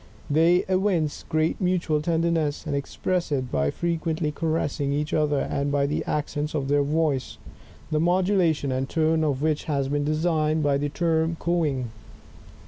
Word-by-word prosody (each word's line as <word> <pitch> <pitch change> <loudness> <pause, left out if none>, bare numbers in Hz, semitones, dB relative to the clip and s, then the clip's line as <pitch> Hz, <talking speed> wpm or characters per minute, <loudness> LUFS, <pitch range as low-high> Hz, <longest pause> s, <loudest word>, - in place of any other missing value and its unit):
They 165 +4 +4
evince 185 -5 0
great 155 +2 0
mutual 175 -4 +1
tenderness 165 -2 0
and 145 -2 -2
express 170 +4 -2
it 130 -3 -1
by 70 -1 +1
frequently 165 - -1
caressing 150 -3 -1
each 150 +1 -2
other, 150 -2 +2
and 140 0 -1
by 140 -1 +2
the 145 +2 -1
accents 150 0 -2
of 135 -2 -1
their 145 0 +3
voice, 145 -2 0 0.5
the 155 - +2
modulation 175 -4 +2
and 130 +1 -2
tone 160 0 +2
of 145 -2 0
which 155 -1 0
have 140 -3 -1
been 145 0 0
designated 155 0 +1
by 140 -1 +2
the 145 0 -1
term 165 +1 0
cooing. 150 -9 0
155 Hz, 155 wpm, -25 LUFS, 145-165 Hz, 0.5 s, They